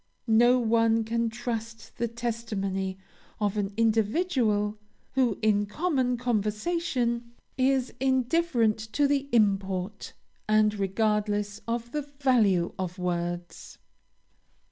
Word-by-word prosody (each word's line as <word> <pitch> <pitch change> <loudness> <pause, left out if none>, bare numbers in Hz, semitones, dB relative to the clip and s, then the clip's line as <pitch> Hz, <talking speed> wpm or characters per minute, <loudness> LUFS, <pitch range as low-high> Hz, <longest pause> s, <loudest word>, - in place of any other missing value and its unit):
No 240 +2 +5
one 230 -1 +2
can 230 +1 0
trust 230 -1 -6
the 235 - 0
testimony 210 -5 -3 0.4
of 205 -1 0
an 205 -1 -1
individual 220 - +1 0.3
who, 250 -5 +1
in 205 -1 +3
common 260 - 0
conversation, 235 - -1 0.2
is 260 -1 +1
indifferent 260 -3 +2
to 290 +3 +3
the 280 0 0
import, 195 -3 0 0.4
and 215 0 +4
regardless 205 +1 0
of 235 0 -3
the 300 - -1
value 250 -11 +1
of 185 0 -3
words. 175 -1 -4
225 Hz, 100 wpm, -27 LUFS, 205-250 Hz, 0.4 s, No